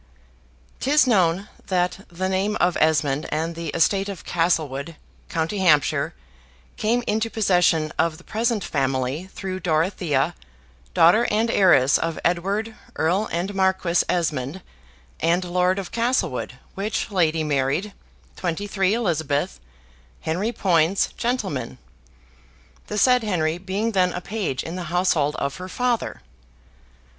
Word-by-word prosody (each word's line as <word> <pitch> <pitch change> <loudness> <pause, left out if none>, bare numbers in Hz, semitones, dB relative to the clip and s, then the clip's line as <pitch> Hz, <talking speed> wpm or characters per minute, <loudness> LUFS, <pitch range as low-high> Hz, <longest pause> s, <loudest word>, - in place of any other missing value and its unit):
'Tis 290 +1 +4
known 190 -4 +2 0.2
that 180 +1 -1
the 185 +2 -3
name 190 +3 0
of 175 0 +2
Esmond 150 -2 +1
and 160 +2 -1
the 165 0 -6
estate 195 +6 +1
of 195 - -7
Castlewood, 165 -3 0 0.3
com. 160 -1 0
Hants, 175 -9 +3 0.8
came 235 +3 0
into 220 +2 0
possession 175 -7 +2
of 165 -1 +1
the 180 - -16
present 225 -2 -1
family 135 +4 -1
through 185 -1 -5
Dorothea, 160 -4 0 0.6
daughter 180 +9 +5
and 225 +2 +1
heiress 140 - +5
of 165 -1 -2
Edward, 195 +6 0 0.2
Earl 185 +7 +1
and 180 +4 -2
Marquis 190 -2 +1
Esmond, 155 -1 -1 0.6
and 175 +2 +2
Lord 180 +1 +1
of 195 -2 -5
Castlewood, 230 - -1 0.2
which 210 +2 -3
lady 165 -4 +2
married, 150 +7 0 0.4
23 195 +3 0
Eliz., 155 - -1 0.6
Henry 185 +8 -1
Poyns, 180 -3 +2
gent.; 245 0 0 1.4
the 210 - -4
said 250 +3 +5
Henry 170 -5 0
being 195 +5 -2
then 185 -3 +2
a 180 - -4
page 195 -11 -3
in 165 - -6
the 180 -1 -4
household 170 -5 +1
of 140 0 -3
her 185 +1 -7
father. 245 +2 -1
180 Hz, 125 wpm, -23 LUFS, 160-205 Hz, 1.4 s, daughter